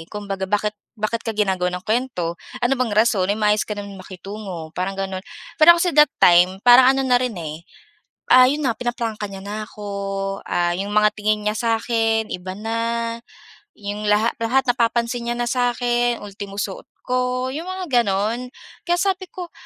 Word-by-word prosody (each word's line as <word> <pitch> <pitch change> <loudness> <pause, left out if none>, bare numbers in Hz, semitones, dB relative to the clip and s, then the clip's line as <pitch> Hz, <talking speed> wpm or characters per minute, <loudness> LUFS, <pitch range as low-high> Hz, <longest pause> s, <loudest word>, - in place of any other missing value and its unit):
Kumbaga 195 -2 -5
bakit 210 +1 0 0.2
bakit 215 +2 -2
ka 225 -2 -5
ginagawan 185 -3 0
ng 180 - -10
kuwento? 215 -8 -2 0.2
Ano 245 - +2
bang 255 - +2
rason? 215 -4 +3
Eh 205 - +1
maayos 210 0 +1
ka 210 - -3
naman 200 -1 -8
makitungo, 185 -3 -8
parang 190 +3 -3
gano'n. 190 -1 -3 0.4
Pero 340 +2 +9
kasi 345 +1 +1
that 300 +1 +6
time 180 +2 +5
parang 255 +2 +7
ano 270 - +1
na 250 -1 +3
rin 250 -6 -2
eh, 160 0 -7 0.6
ah, 255 0 +7
'yon 290 -1 -1
na 230 - +1
pinaprangka 230 -4 -3
niya 195 - -8
na 205 +2 -5
ako. 210 -1 -9 0.6
Ah 175 0 0
'yong 195 +3 -3
mga 210 0 +3
tingin 210 0 -1
niya 210 - +1
sa’kin 225 -1 0
iba 185 0 -6
na. 225 +2 -3 1.0
‘Yong 205 +1 -4
laha 210 +3 +3
lahat 250 +4 +2
napapansin 235 -1 0
niya 240 - -1
na 240 - -1
sa’kin 240 -1 0
ultimo 200 0 -8
suot 200 -1 -4 0.2
ko, 255 +1 -1
'yong 325 +6 -5
mga 365 -10 +1
gano'n. 220 +4 -1 0.4
Kaya 350 - +3
sabi 375 0 -1
ko, 355 -2 -8
220 Hz, 175 wpm, -21 LUFS, 200-245 Hz, 1.0 s, Pero